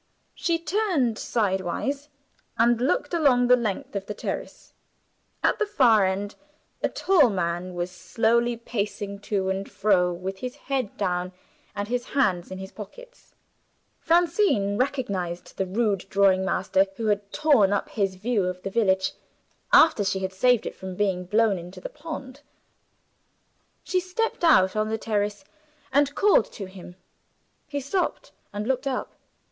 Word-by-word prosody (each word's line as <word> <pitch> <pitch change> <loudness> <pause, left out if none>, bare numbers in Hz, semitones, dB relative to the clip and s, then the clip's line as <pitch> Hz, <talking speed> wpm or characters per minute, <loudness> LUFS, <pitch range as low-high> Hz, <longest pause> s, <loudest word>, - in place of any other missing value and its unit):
She 335 -1 0
turned 330 - 0
sidewise, 215 - -1 0.5
and 235 0 +3
looked 290 - 0
along 275 -7 +4
the 250 +1 +6
length 240 +3 -3
of 195 0 -3
the 210 - -5
terrace. - - -6 0.7
At - - +2
the 430 - +1
far 235 - +4
end 200 +2 -3 0.5
a - - +1
tall 340 -10 +4
man 180 -1 -2
was 175 +1 -3
slowly 230 +6 +1
pacing 205 -3 -4
to 195 -2 -1
and 195 +1 -4
fro, 185 -4 +2
with 185 +2 -5
his 250 +3 -5
head 270 -6 -3
down 180 -2 -1 0.4
and 205 0 -3
his 245 +1 -1
hands 185 -10 +2
in 185 - -6
his 190 0 -8
pockets. - - -12 0.6
Francine 335 - +2
recognized 200 -9 -2
the 190 - -1
rude 200 -1 0
drawing 195 -1 +3
master, 190 0 +1
who 225 - -4
had 205 -1 0
torn 285 -11 +4
up 205 - -1
his 195 -3 -1
view 210 0 0
of 180 0 -4
the 195 - -4
village, 190 -4 +2 0.6
after 315 -10 +6
she 195 0 0
had 190 0 -3
saved 245 +4 +3
it - - -4
from 190 -1 -8
being 185 -2 0
blown 210 0 +2
into 180 +2 -10
the - - -6
pond. 290 -3 -8 1.4
She 370 - 0
stepped 370 +2 -2
out 190 - +5
on 215 0 0
the 220 - -1
terrace, 210 +2 -2 0.5
and 285 +1 +3
called 405 - +4
to 200 - -6
him. 185 -1 -12 0.7
He 285 -1 -3
stopped, 345 +7 -2 0.2
and 205 +1 -4
looked 265 +1 0
up. 260 -2 -3
210 Hz, 150 wpm, -25 LUFS, 190-270 Hz, 1.4 s, the